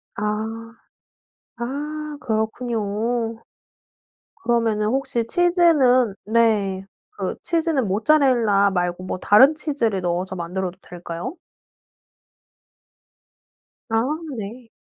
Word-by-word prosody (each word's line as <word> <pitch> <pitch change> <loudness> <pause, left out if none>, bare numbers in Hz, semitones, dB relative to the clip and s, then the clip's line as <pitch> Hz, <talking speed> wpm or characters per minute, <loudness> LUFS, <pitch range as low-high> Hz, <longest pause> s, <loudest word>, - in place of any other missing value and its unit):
아. 220 +2 -3 0.8
아 295 +5 -4
그렇군요. 220 +1 -1 1.6
그러면은 230 -3 +1
혹시 245 -2 -1
치즈는 295 - +4
네 210 -4 +2 0.4
그 185 - -2
치즈는 325 -8 0
모짜렐라 220 -3 +3
말고 180 0 -2
뭐 185 - -4
다른 265 +12 +6
치즈를 260 - -1
넣어서 180 +2 -2
만들어도 180 +2 -4
될까요? 175 - -7 2.6
아 - - +1 0.4
네. 225 +3 -7
225 Hz, 180 characters per minute, -22 LUFS, 195-265 Hz, 2.6 s, 다른